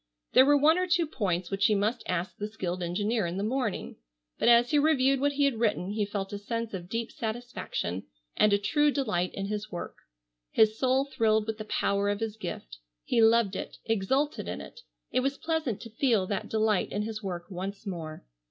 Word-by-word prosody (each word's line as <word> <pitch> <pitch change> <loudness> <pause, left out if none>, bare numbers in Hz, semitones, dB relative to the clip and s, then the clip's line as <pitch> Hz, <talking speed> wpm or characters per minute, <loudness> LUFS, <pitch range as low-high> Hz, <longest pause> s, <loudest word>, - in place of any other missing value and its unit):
There 260 +1 +7
were 290 0 +6
one 315 +5 +5
or 365 - 0
two 350 -1 +3
points 185 - -2
which 195 +1 +3
he 215 - +3
must 215 +5 0
ask 180 +1 -2
the 210 - -4
skilled 185 -4 -4
engineer 205 +4 0
in 170 +2 -4
the 200 - -1
morning, 235 -2 -2 0.4
but - - +4
as 240 0 +6
he 295 - +4
reviewed 275 -3 +3
what 285 +1 +1
he 285 0 +2
had 260 -5 0
written 210 -4 0
he 210 -1 -1
felt 200 -1 -4
a 205 - -4
sense 230 +2 -4
of 180 -2 -6
deep 230 +2 -3
satisfaction, 220 - -4 0.3
and 210 - +4
a 200 - +5
true 295 +9 +2
delight 215 -11 0
in 195 - -3
his 210 +1 -4
work. 175 - -6 0.5
His 220 0 +4
soul 260 +3 +2
thrilled 220 -5 +1
with 220 0 -4
the 215 - -5
power 200 -1 0
of 205 0 -1
his 225 -2 -3
gift. - - -7 0.2
He 230 - +2
loved 225 -3 +4
it, - - -5
exulted 250 +7 0
in - - -4
it. - - -10 0.3
It - - +2
was 275 +2 -1
pleasant 320 -9 -1
to 230 - -9
feel 225 -4 +2
that 195 0 -3
delight 220 -3 +1
in 205 - -1
his 215 0 -5
work 180 -2 -5
once 195 +3 -5
more. 165 -5 -6
215 Hz, 210 wpm, -28 LUFS, 195-255 Hz, 0.5 s, There